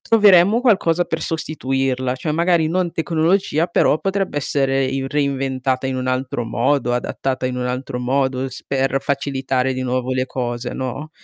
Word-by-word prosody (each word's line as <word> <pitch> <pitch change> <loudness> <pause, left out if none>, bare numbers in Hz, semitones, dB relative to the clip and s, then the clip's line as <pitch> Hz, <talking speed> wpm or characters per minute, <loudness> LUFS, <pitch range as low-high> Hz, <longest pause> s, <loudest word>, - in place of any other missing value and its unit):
troveremmo 205 -1 +5
qualcosa 180 -8 +3
per 160 - -3
sostituirla, 135 -5 -1
cioè 155 +4 -4
magari 170 0 +2
non 175 0 0
tecnologia, 165 0 +1
però 170 -3 +2
potrebbe 195 -2 -2
essere 135 -1 +1
i 135 +1 -2
reinventata 135 -2 -1
in 130 - -2
un 130 0 -3
altro 130 -1 -1
modo, 125 +3 0
adattata 130 +1 -2
in 125 0 -3
un 125 0 -2
altro 125 0 -3
modo 130 +1 0
s 130 - -10
per 135 0 0
facilitare 135 -2 -1
di 130 - -3
nuovo 130 0 -1
le 130 0 0
cose, 120 -1 -4
no? 135 +4 -5
135 Hz, 160 wpm, -20 LUFS, 130-160 Hz, -, troveremmo